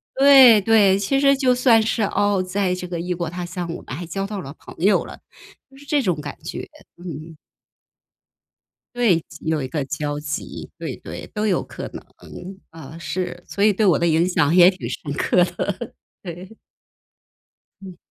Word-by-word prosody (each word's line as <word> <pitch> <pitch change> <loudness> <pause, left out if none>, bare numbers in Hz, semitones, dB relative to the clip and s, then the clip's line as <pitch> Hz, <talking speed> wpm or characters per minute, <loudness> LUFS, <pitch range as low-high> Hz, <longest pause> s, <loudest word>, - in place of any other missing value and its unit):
对 265 -5 +8
对， 200 -2 +4
其 270 +7 0
实 275 0 +4
就 260 -2 +2
算 245 -3 +4
是， 220 0 -1
哦， 205 -1 +1
在 185 0 -1
这 180 0 -6
个 175 -1 -4
异 180 +1 -2
国 170 -1 -3
他 180 0 -5
乡， 175 -1 -5
我 - - -9
们 125 - -8
还 175 - -6
交 195 +4 -4
到 205 -3 -5
了 140 -1 -9
朋 - - -13
友 210 - +4
了， - - -10 0.5
就 - - -18
是 285 - -15
这 290 0 +2
种 170 -7 -1
感 145 - -7
觉， - - -6 0.3
嗯。 160 -1 -8 1.6
对， 225 -9 +3
集 - - -14
有 160 -1 +1
一 - - -3
个 150 0 -3
交 145 0 -3
集， 150 +1 -6
对 - - -5
对， - - -9
都 215 0 -1
有 195 - +1
可 - - -8
能。 - - -10 0.6
啊， 160 -1 -11
是， 175 0 -4
所 200 - -2
以 215 - +5
对 215 - 0
我 175 -6 +4
的 170 - 0
影 165 +1 +3
响 160 -3 +2
也 180 0 +8
挺 190 -1 -5
深 145 - -6
刻 180 +4 +2
的， 185 +5 -4 0.3
对。 180 +3 -9 1.3
嗯。 185 -3 -11
185 Hz, 200 characters per minute, -21 LUFS, 165-215 Hz, 1.6 s, 对